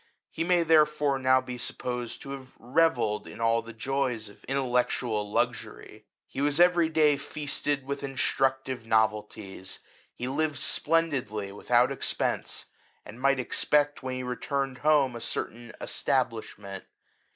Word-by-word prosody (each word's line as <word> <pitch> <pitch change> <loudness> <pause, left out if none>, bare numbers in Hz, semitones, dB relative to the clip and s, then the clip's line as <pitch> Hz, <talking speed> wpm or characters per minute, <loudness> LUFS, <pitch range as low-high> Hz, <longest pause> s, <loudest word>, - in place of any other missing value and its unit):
He 165 - -2
may 175 0 +3
therefore 150 -3 +3
now 130 0 +4
be 125 -1 -7
supposed 125 -1 -4
to 135 - -7
have 135 -2 -9
revelled 125 -4 +1
in - - -10
all 115 0 +2
the 115 - -10
joys 120 -2 -2
of 105 - -18
intellectual 125 -5 0
luxury; - - -2 0.2
he 135 - -5
was 145 +2 +1
every 175 -2 +5
day 155 -2 +4
feasted 145 -1 -2
with 140 +1 -4
instructive 135 -2 0
novelties; 105 -3 -1 0.4
he 125 - -4
lived 150 +3 0
splendidly 135 -11 +1
without 120 +5 +2
expence; 135 - -2 0.4
and 115 +4 -11
might 140 0 +3
ex 125 - -1
pect 145 0 +2
when 130 -1 -3
he 130 - -4
returned 135 +1 -2
home 145 -5 +3
a 120 - -6
certain 120 +1 -4
esta - - +1
blishment. 100 -4 -9
130 Hz, 140 wpm, -28 LUFS, 115-145 Hz, 0.4 s, every